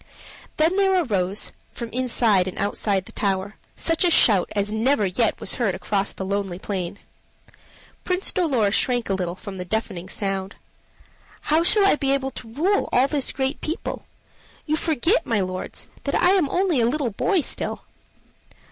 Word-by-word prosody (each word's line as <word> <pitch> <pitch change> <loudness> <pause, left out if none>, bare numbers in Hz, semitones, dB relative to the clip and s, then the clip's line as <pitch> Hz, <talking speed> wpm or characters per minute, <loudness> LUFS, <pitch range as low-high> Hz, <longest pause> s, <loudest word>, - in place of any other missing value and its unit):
Then 325 +5 +2
there 385 -2 +3
arose, 200 - -1 0.2
from 235 -1 -7
inside 230 -6 +2
and 185 - -6
outside 200 -1 0
the - - -11
tower, 195 0 -2 0.2
such 330 +1 +1
a 355 - +4
shout 205 - +5
as 205 0 0
never 220 +1 +2
yet 205 +4 0
was - - -1
heard 200 -6 +1
across 200 0 -1
the 190 - -6
lonely 195 -2 -2
plain. 190 -1 -4 1.1
Prince 365 +1 -1
Dolor 265 - +1
shrank 240 0 +1
a - - +2
little 180 -2 -2
from 190 -1 -8
the - - -3
deafening 185 -2 -3
sound. 195 -1 -2 1.0
"How 320 - +5
shall 400 +3 +5
I 395 - +4
be 275 -1 +1
able 270 -1 -3
to 225 -3 -10
rule 355 - +1
all 255 +2 +4
this 280 -2 -1
great 265 +1 -2
people? 320 +2 -4 0.6
You 310 - +1
forget, 325 - +1
my 225 -3 +1
lords, 185 -1 -4 0.2
that 280 - 0
I 360 +1 +4
am 365 -8 +3
only 355 -7 +1
a 230 - +3
little 275 -3 -1
boy 360 - +1
still." - - -3
230 Hz, 170 wpm, -23 LUFS, 195-310 Hz, 1.1 s, shout